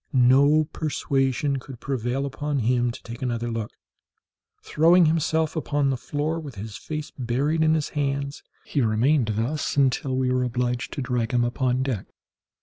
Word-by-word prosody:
No 140 +4 +5
persuasion 140 -2 0
could 130 -2 -11
prevail 130 0 -2
upon 145 +1 -3
him 120 0 +2
to 120 - -8
take 120 0 -8
another 120 -2 -2
look; 115 -2 -3 0.9
throwing 170 +3 +5
himself 160 0 +1
upon 145 -3 0
the - - 0
floor, 150 +6 -2
with 145 -6 -8
his 105 +1 -7
face 155 -1 -6
buried 135 +6 0
in 160 0 +4
his 155 -2 -1
hands, 140 -1 -2 0.2
he 145 - 0
remained 115 +1 +2
thus 135 +7 -2
until 135 -1 +2
we 130 -1 +1
were 130 0 +1
obliged 125 0 -1
to 140 - -3
drag 125 -2 -1
him 120 - +3
upon 125 +1 0
deck. 125 -8 -3
135 Hz, 160 wpm, -25 LUFS, 120-150 Hz, 0.9 s, No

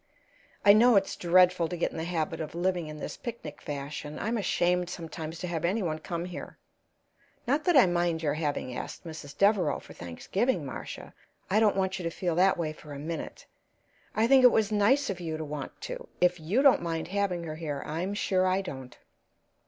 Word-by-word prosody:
I 200 - +9
know 235 +2 +6
it's 195 0 +2
dreadful 180 -1 +4
to 175 - -5
get 170 - 0
in - - -8
the 160 - -3
habit 165 -2 -2
of 155 0 -6
living 175 -1 0
in 155 0 -7
this - - -6
picnic 230 -11 -7
fashion; 145 +1 -5
I'm 225 +3 -1
ashamed 180 -3 +1
sometimes 165 -2 -6
to 180 - -5
have 165 -3 -3
any 195 +5 +1
one 155 -3 -2
come 170 +2 -4
here. 180 -1 -8 0.9
Not 285 +5 +1
that 350 -5 +5
I 255 - +8
mind 175 -2 0
your 145 -2 +1
having 145 -5 -2
asked - - -7
Mrs. 155 -4 -9
Devereaux 200 -7 +3
for - - -13
Thanksgiving, 170 - -2
Marcia; 135 - -7 0.4
I 210 - +4
don't 215 -3 +4
want 190 0 0
you - - -5
to 170 - -1
feel 175 +1 -2
that 185 +3 +4
way 155 -3 -2
for 150 -1 -11
a - - -6
minute. 160 +3 -6 0.7
I 220 - +3
think 265 +2 +6
it 250 - +9
was 220 -1 +2
nice 215 +5 +3
of 185 - -6
you 160 -2 -3
to 155 - -4
want 145 -2 -6
to. - - -6
If 180 -1 +3
you 195 - +1
don't 275 -3 +6
mind 165 -1 -3
having 190 -3 -1
her 155 -2 -6
here, 150 -4 -4
I'm 175 +6 -3
sure 185 -2 +1
I 185 +1 +2
don't. 130 -9 -8
175 Hz, 205 wpm, -29 LUFS, 155-200 Hz, 0.9 s, I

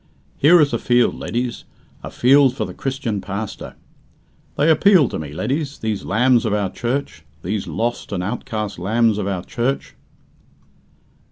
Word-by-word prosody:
Here 170 +5 +6
is 145 -5 +3
a 115 - 0
field, 120 0 +2
leddies 120 0 -4 0.4
a - - -7
field 135 0 +4
for 110 - -2
the 90 - -8
Christian 130 -6 -3
pastor. 100 +1 -6 0.8
They 145 - +2
appeal 165 -2 +5
to - - -4
me, 75 -2 -7
leddies, 135 - -3
these 110 -3 -3
lambs 125 +1 +3
of 105 - 0
our 100 -3 -1
Church 120 - -3 0.2
these 100 +3 -3
lost 120 +1 -3
and 90 -3 -2
outcast 105 -2 -4
lambs 110 +3 +1
of 100 - -2
our 95 -3 -3
Church." 125 +6 -3
120 Hz, 155 wpm, -20 LUFS, 100-135 Hz, 0.8 s, Here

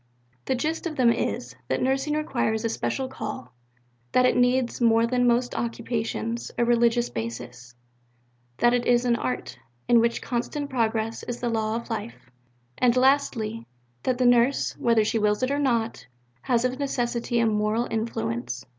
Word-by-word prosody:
The 260 - 0
gist 315 +7 -2
of 310 - -5
them 245 -4 +4
is: 120 - -2
that 130 - 0
nursing 270 +3 0
requires 240 -7 -1
a - - +1
special 260 +3 -2
call; 210 - -7 0.6
that 250 - +5
it - - +3
needs, 245 0 +2
more 230 -1 +4
than 245 +1 +1
most 245 +1 +2
occupations, 230 0 -3
a 240 - +2
religious 235 0 +2
basis; 120 +2 -6 0.8
that 240 0 +4
it 245 -1 0
is 245 0 +3
an 240 -1 +3
art, 130 - -4 0.3
in 240 -1 +6
which 235 0 +1
constant 280 +4 -3
progress 225 -2 -1
is 245 0 -5
the 240 - -1
law 220 -1 -1
of 235 0 -5
life; 215 - -6 0.5
and 250 0 +3
lastly, 250 -4 +1 0.3
that 255 - 0
the 255 - +1
nurse, 245 +2 +3
whether 230 -2 +3
she 225 - 0
wills 210 +2 +1
it 255 - +1
or 285 - 0
not, 235 -5 -1 0.3
has 245 -1 +1
of 255 +1 -2
necessity 240 -3 -1
a 230 - +3
moral 215 +2 +1
influence. 120 - -3
235 Hz, 165 wpm, -25 LUFS, 220-250 Hz, 0.8 s, in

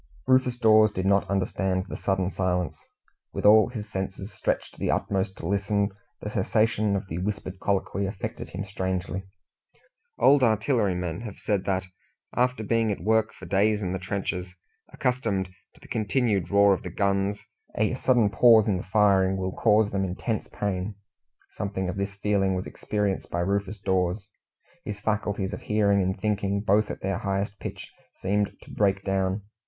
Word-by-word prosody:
Rufus 130 -1 +3
Dawes 110 -2 +5
did 95 -2 -3
not 100 0 +2
understand 95 -1 0
the - - -7
sudden 95 -1 0
silence. 90 -2 -1 0.5
With - - -3
all 110 +2 +7
his 110 -4 -6
senses 95 0 -5
stretched - - -2
to - - -17
the - - -1
utmost 95 -1 -1
to - - -7
listen, 100 +1 0 0.3
the 105 - -5
cessation 110 0 +1
of 95 0 -3
the 80 0 -4
whispered 95 -1 -4
colloquy 100 0 -1
affected 95 0 -5
him 95 +3 -5
strangely. 95 -1 -3 0.9
Old 140 0 +5
artillery 110 -3 +2
men 90 +2 -3
have 110 -4 -7
said 100 -3 -1
that, 95 -1 0 0.5
after 125 -2 +1
being 115 0 +1
at 100 - -3
work 110 +1 +2
for 95 - -12
days 105 +3 +2
in 90 - -2
the 95 - -2
trenches, 90 -1 -4 0.4
accustomed 115 -7 -1 0.3
to - - -20
the - - -15
continued 110 -3 0
roar 100 0 +5
of 95 - -2
the - - -6
guns, 100 0 0 0.3
a 110 +3 +2
sudden 120 -5 +2
pause 110 +1 +6
in 100 -3 +2
the 90 - -5
firing 95 -3 +4
will 95 0 -2
cause 105 0 +3
them 95 -1 0
intense 95 +4 -3
pain. 100 0 -3 0.6
Something 95 -2 -3
of 90 - -3
this 100 0 -3
feeling 100 -1 +1
was 90 - -3
experienced 105 -2 -2
by 85 - -1
Rufus 100 +2 -1
Dawes. 95 +1 0 0.6
His 105 -1 -5
faculties 100 -2 -1
of - - -6
hearing 100 -2 +2
and 95 0 -1
thinking 100 -1 0
both 105 +1 +2
at - - -6
their 95 -1 -1
highest 100 +1 -2
pitch - - -7 0.2
seemed 100 +1 0
to - - -14
break 100 -1 +1
down. 95 0 0
100 Hz, 170 wpm, -26 LUFS, 95-105 Hz, 0.9 s, all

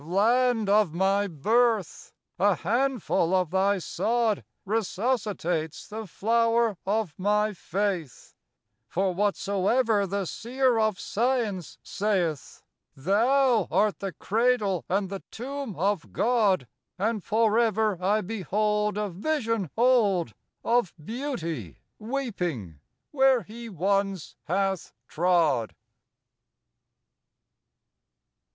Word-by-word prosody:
Land 225 +6 +2
of 200 -5 +3
my 195 +2 +2
birth! 215 - 0 0.3
a 200 0 +4
handful 235 -6 0
of 180 -4 +1
thy 195 +2 +2
sod 225 +3 0 0.2
Resuscitates 200 - -2
the 220 0 -7
flower 230 +3 +1
of 205 -5 0
my 210 +2 +1
faith; 185 -6 -3 0.5
For 190 +5 0
whatsoever 200 +2 +1
the 200 +1 -2
seer 245 +4 0
of 215 -3 +1
science 225 - -1
saylh, 180 - -2 0.3
Thou 230 - +2
art 205 +3 +1
the 195 -2 -4
cradle 210 - 0
and 195 0 0
the 195 - -5
tomb 270 -2 -6
of 195 0 -1
God; 210 - +2 0.3
And 210 +1 -1
forever 220 -3 +2
I 210 +3 +2
behold 210 +1 -1
A 210 0 -1
vision 225 - -2
old 210 - +3 0.3
Of 235 -6 +1
Beauty 165 - -5 0.2
weeping 180 - -4 0.3
where 265 -4 +4
He 230 +4 -9
once 195 -1 -1
hath 195 +1 -1
trod. 165 -9 +1
205 Hz, 95 wpm, -26 LUFS, 185-230 Hz, 0.5 s, a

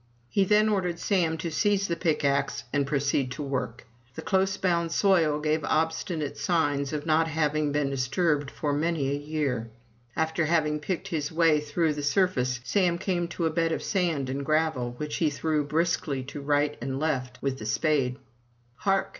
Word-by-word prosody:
He 195 - +2
then 210 +2 +4
ordered 185 -5 0
Sam 170 -4 +1
to 165 0 -4
seize 200 +4 +1
the 170 - -1
pickaxe 140 -4 0
and 140 -1 +1
proceed 140 -2 0
to 145 - -5
work. 130 -4 -3 0.3
The - - -6
close 190 0 +1
bound 170 -3 0
soil 165 -6 +3
gave 155 +1 0
obstinate 160 -1 -1
signs 145 -6 0
of 150 -1 -3
not 160 0 +3
having 155 -1 0
been 145 -1 0
disturbed 145 +2 0
for 145 0 -2
many 150 -2 0
a - - +1
year. 145 -6 -2 0.5
After 160 +1 0
having 155 -2 +1
picked 185 +5 -3
his 150 -5 -2
way 160 -2 +4
through 150 +2 0
the 145 - -4
sur 165 +7 +3
face, 125 -8 -2
Sam 175 - +1
came 175 -1 -1
to 170 0 -3
a 160 - +1
bed 165 0 +1
of - - -2
sand 170 -9 0
and 135 +2 -3
gravel, 155 -5 0
which 150 +1 -3
he 160 - +2
threw 150 +1 0
briskly 155 -3 0
to 145 +2 -7
right 145 +1 +1
and 135 +2 -3
left 130 -5 -2
with 135 -1 -1
the 110 - -5
spade. 135 0 +1 0.6
"Hark!'' 195 +4 +1
155 Hz, 180 wpm, -27 LUFS, 140-170 Hz, 0.6 s, then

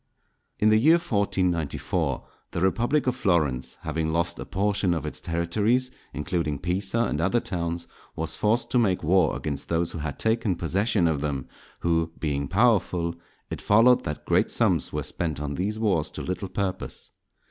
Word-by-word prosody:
In 105 - +3
the 110 0 +5
year 155 +8 +6
1494 95 - 0 0.3
the - - -1
Republic 120 +10 +2
of 125 -1 +1
Florence, 75 - 0
having 80 0 -2
lost 85 +1 0
a - - -5
portion 100 -2 +1
of 80 - -3
its - - -4
territories, 105 +10 +1 0.2
including 75 -1 -2
Pisa 95 - 0
and 75 -8 -1
other 95 +7 +2
towns, 85 -4 -3 0.3
was 80 0 -2
forced 110 +3 +1
to 125 - +4
make 95 -7 +1
war 85 0 +3
against 70 -2 -4
those 85 0 0
who 80 - -6
had 75 -3 -4
taken 110 -4 +1
possession 95 +2 +1
of 75 -4 0
them, 70 -4 -2 0.3
who 80 -1 +1
being 70 -3 -1
powerful, 90 -5 +2 0.4
it - - -4
followed 115 +4 +5
that 75 - -5
great - - +2
sums - - +2
were - - -2
spent 80 -4 -2
on 75 -1 -3
these 100 +8 -2
wars 95 -9 +1
to - - -7
little 90 +1 -3
purpose. 95 0 -3
90 Hz, 170 wpm, -26 LUFS, 80-105 Hz, 0.4 s, year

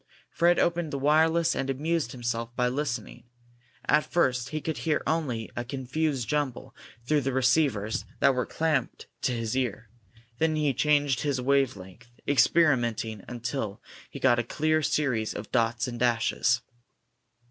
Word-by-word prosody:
Fred 175 +1 +3
opened 170 -2 +1
the 140 - -2
wireless 160 +4 +3
and 135 - -2
amused 150 0 -1
himself 120 -1 -4
by 125 -1 +1
listening. 125 -4 -4 0.6
At 150 - +3
first 130 -7 +1
he 155 - -3
could 160 0 -4
hear 160 -2 0
only 135 -9 -1
a 120 - -2
confused 130 0 -2
jumble 130 -2 -2 0.3
through 150 +2 +2
the 135 +1 -1
receivers 130 -5 +1 0.2
that 140 -1 +5
were 125 -1 -1
clamped 160 -3 -1 0.2
to - - +1
his 115 -1 -2
ear. 120 -4 -2 0.5
Then 160 0 +2
he 150 -3 +1
changed 145 -1 +2
his 140 -3 -1
wave 135 -3 +2
length, 95 +6 -13 0.2
experimenting 120 - +2
until 120 -3 -4 0.3
he - - -8
got 120 -2 +4
a - - +1
clear 155 +6 0
series 130 -8 0
of - - -7
dots 115 -1 +1
and 120 -1 -6
dashes. 120 0 +2
130 Hz, 150 wpm, -27 LUFS, 120-150 Hz, 0.6 s, that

